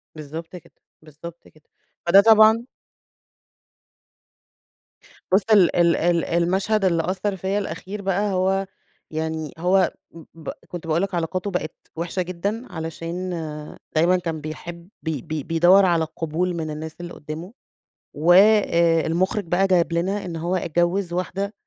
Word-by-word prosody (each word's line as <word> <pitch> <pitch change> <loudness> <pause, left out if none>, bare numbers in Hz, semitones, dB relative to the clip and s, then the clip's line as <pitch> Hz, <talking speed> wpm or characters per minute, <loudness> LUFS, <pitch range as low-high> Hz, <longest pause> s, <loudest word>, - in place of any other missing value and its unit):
بالضبط 160 +4 -8
كده، 175 - -13 0.3
بالضبط 160 +2 -12
كده. 155 -1 -24 0.4
فده 195 +3 +7
طبعًا 220 +1 +6 2.7
بُص 195 +2 +5
ال 190 -5 +5
ال 170 -1 +4
ال 170 -1 +1
المشهد 190 +5 +1
اللي 165 -3 +2
أثّر 195 +1 -2
فيَّ 190 +2 -2
الأخير 200 0 -5
بقى 195 +1 0
هو 190 +1 +1 0.5
يعني 160 -1 -3
هو 185 +2 +2 0.4
ب 160 -2 -8 0.2
كنت 175 -2 -8
باقول 160 +3 +1
لك 195 -2 -2
علاقاته 180 +4 -2
بقت 160 -3 -3 0.2
وحشة 170 +3 -2
جدًا 200 +7 -3
علشان 165 +3 -5 0.7
دايمًا 175 +4 +4
كان 165 -3 -4
بيحب 170 +3 -8
ب 160 - -2
ب 155 0 -4
بيدوّر 175 +4 +5
على 170 -2 +2
قبول 170 +3 -1
من 160 -2 -3
الناس 155 +1 -6
اللي 175 - -7
قُدّامه، 160 +7 -8 0.6
وآآ 170 -1 +4
المخرج 185 +4 0
بقى 180 +3 +2
جايب 175 -2 +2
لنا 190 +4 -1
إن 170 -2 -5
هو 170 +3 -2
اتجوّز 175 +2 0
واحدة 195 +3 -3
175 Hz, 135 wpm, -23 LUFS, 165-190 Hz, 2.7 s, فده